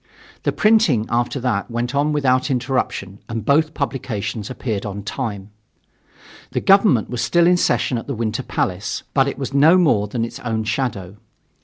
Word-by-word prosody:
The - - 0
printing, 210 - +3
after 120 +3 0
that, 120 -6 -1
went 120 +1 -3
on 145 +2 +1
without 130 -2 +1
interruption 125 -7 -2
and 115 -2 -4
both 155 +2 +2
publications 120 -6 -3
appeared 110 -5 -3
on 100 -1 -5
time. 105 -3 -5 1.0
The - - +1
government 195 - +4
was 125 - -2
still 170 -1 +3
in 180 +1 +5
session 125 -7 +1
at - - -10
the 140 - -3
Winter 115 +2 -2
Palace, 95 -5 -3
but 135 -1 +3
it 140 - -3
was 135 0 -5
no 155 +6 +6
more 135 - +3
than 115 +2 -2
its 115 - -8
own 110 -2 -2
shadow. 105 -4 -3
125 Hz, 170 wpm, -20 LUFS, 105-140 Hz, 1.0 s, no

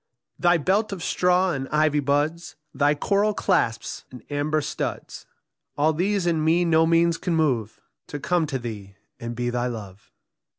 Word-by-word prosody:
Thy 175 -1 +4
belt 195 +7 +1
of 185 -4 -5
straw 180 +1 +2
and 135 -3 -4
ivy 150 -1 +2
buds, 145 +5 -1 0.2
Thy 145 +1 +2
coral 205 +7 +1
clasps 120 - 0
and 125 -3 -12
amber 145 +2 0
studs, 145 - -5 0.5
All 155 +2 +3
these 190 +3 0
in 165 -3 +1
me 170 +3 +3
no 160 -1 +4
means 165 0 +3
can 170 -1 -1
move 125 -9 0 0.3
To 145 - -6
come 170 +2 0
to 140 -3 -2
thee 105 -5 -8 0.2
and 120 0 -5
be 120 +1 -2
thy 120 0 -1
love. 105 -5 -8
155 Hz, 165 wpm, -24 LUFS, 130-175 Hz, 0.5 s, Thy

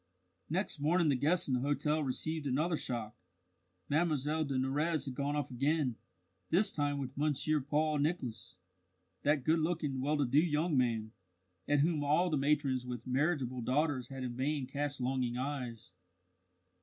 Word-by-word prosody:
Next 175 -1 -1
morning 160 +2 +3
the 140 - +3
guests 165 +7 +2
in 135 - 0
the 125 - +2
hotel 145 +3 0
received 150 +3 -2
another 155 +6 +1
shock. 115 -7 -4 0.7
Mlle 155 +4 +2 0.4
de 140 -2 -2
Nurrez 150 +5 0
had 135 - -4
gone 140 +3 -1
off 145 -2 -2
again 135 0 +1 0.5
this 195 +5 +3
time 145 -1 0
with 135 -1 -5
Monsieur 150 +1 +1
Paul 150 +2 +1
Nicholas 140 - -2 0.6
that 145 -2 +2
good 160 +4 +3
looking, 155 -5 -1
well 150 +3 +1
to 145 - +2
do 130 +4 +4
young 160 0 +1
man, 115 -4 +1 0.6
at 145 -1 +3
whom 155 -1 +1
all 160 +5 +2
the - - +2
matrons 140 -2 +1
with 125 -2 -6
marriageable 130 -2 0
daughters 130 0 0
had 135 -1 -6
in 120 -1 -4
vain 140 +2 -1
cast 145 +1 -3
longing 125 -1 -1
eyes. 125 -7 -4
145 Hz, 160 wpm, -33 LUFS, 130-155 Hz, 0.7 s, do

